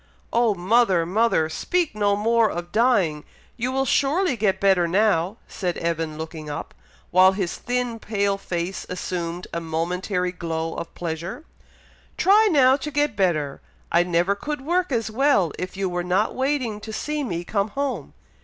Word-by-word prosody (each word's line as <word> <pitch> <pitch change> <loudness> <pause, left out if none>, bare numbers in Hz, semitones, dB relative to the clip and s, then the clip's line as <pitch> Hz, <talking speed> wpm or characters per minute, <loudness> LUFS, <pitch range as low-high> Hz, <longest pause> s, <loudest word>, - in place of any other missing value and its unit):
"Oh, 230 -3 +3
mother! 190 -2 +3
mother! 190 -3 +2
speak 335 - -1
no 205 -1 +2
more 225 +1 +3
of 175 -1 -5
dying! 205 -11 +2 0.3
You 250 +2 -2
will 270 +1 0
surely 285 +5 +2
get 195 -4 +1
better 190 -3 +3
now!" 190 +1 +2
said 180 -3 -3
Evan, 165 -2 -2
looking 160 -1 -7
up, 145 - -6 0.4
while 185 +1 +6
his 190 -3 -2
thin 245 -2 -2
pale 200 -2 -1
face 175 0 -3
assumed 175 -1 -4
a 170 - -2
momentary 180 +3 -2
glow 165 -2 -3
of 170 - -6
pleasure. 170 - -5 0.7
"Try 420 +3 +5
now 265 -6 +5
to 290 +2 -5
get 290 -4 0
better! 155 -8 0 0.3
I 170 - +5
never 175 +2 +2
could 295 +8 -5
work 350 +4 0
as 230 -3 -1
well, 225 - +3
if 185 +1 -5
you 195 -1 0
were 175 -1 -2
not 185 +4 +1
waiting 260 -5 -1
to 220 +1 -8
see 300 +6 -2
me 175 -9 -3
come 200 +2 0
home! 275 +5 -3
200 Hz, 165 wpm, -23 LUFS, 175-245 Hz, 0.7 s, while